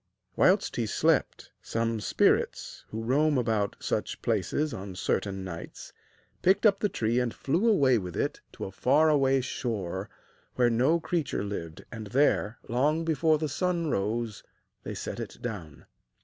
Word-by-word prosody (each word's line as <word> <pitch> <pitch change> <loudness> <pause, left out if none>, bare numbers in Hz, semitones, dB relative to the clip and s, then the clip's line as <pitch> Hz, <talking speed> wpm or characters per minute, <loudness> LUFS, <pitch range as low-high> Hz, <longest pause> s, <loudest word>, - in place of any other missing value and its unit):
Whilst - - +3
he - - 0
slept, - - +1
some 115 0 -1
spirits, 105 - +1
who 110 +1 -5
roam 145 +5 +2
about 110 -4 0
such - - -2
places 150 0 0
on 95 -1 -6
certain 95 +1 -1
nights, 85 -3 -8 0.5
picked 195 +4 +3
up 200 -2 +5
the 210 - +1
tree 115 -6 0
and 125 -2 0
flew 175 - +1
away 135 - +4
with 90 -3 -6
it - - -1
to - - -6
a 95 - -6
far 145 +10 +3
away 135 -3 +3
shore 100 -7 -3 0.5
where 120 -1 +3
no 130 +9 +3
creature 165 - -2
lived, 85 -6 -6
and 110 -2 -7
there, 120 -2 +2
long 150 +7 +1
before 160 0 +3
the 155 0 -2
sun 170 +1 -1
rose, 110 +2 -2 0.4
they - - -6
set - - -5
it - - -6
down. 90 -11 -7
120 Hz, 155 wpm, -28 LUFS, 105-155 Hz, 0.5 s, up